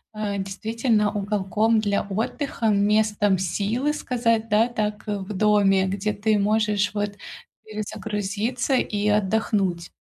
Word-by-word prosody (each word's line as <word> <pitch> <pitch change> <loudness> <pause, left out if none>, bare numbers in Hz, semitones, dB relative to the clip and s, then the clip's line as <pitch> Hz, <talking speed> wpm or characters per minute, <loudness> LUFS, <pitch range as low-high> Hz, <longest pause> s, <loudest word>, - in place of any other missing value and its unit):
э, 205 -2 -2
действительно 210 +2 0
уголком 210 +2 +1
для 205 -2 0
отдыха, 225 +4 -2
местом 210 -1 +2
силы 210 - -1
сказать, 230 -5 0
да, 215 +2 +4
так, 210 -3 -3
э, 205 -1 -1
в 190 +2 -7
доме, 195 -1 +3
где 200 +2 -1
ты 210 0 +1
можешь, 210 0 +1
вот, 205 0 -2 0.5
перезагрузиться 215 +3 -3
и 210 -4 0
отдохнуть. 200 -4 0
210 Hz, 120 wpm, -24 LUFS, 200-220 Hz, 0.5 s, да